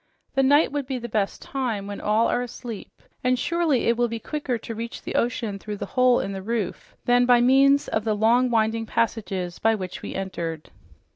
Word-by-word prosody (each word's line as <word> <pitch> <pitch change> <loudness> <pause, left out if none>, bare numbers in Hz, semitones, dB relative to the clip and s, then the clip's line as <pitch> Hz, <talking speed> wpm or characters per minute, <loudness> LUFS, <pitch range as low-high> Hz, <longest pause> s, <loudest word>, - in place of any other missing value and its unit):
The 270 - +3
night 285 +3 +4
would 285 -2 -3
be 265 -1 -2
the 240 -1 -5
best 210 -3 -2
time, 245 -7 -3
when 205 0 -6
all 215 +2 +2
are 245 - +1
asleep, 240 -3 -7 0.3
and 250 0 +2
surely 330 -3 +1
it 235 - +3
will 240 0 +2
be 230 0 -4
quicker 265 +1 -3
to 230 - -7
reach 230 +1 -6
the - - -5
ocean 225 -4 -1
through 210 +1 -6
this - - -6
hole 255 -1 +4
in 195 - -3
the 195 -1 -5
roof 220 -2 -4
than 245 0 +4
by 245 -1 +6
means 275 +3 +4
of 215 - -1
the 215 -1 0
long, 235 +4 +3
winding 225 -1 +1
passages 200 -7 -2
by 225 0 +3
which 185 -3 -6
we - - -6
entered." 170 -5 -4
230 Hz, 210 wpm, -24 LUFS, 210-255 Hz, 0.3 s, by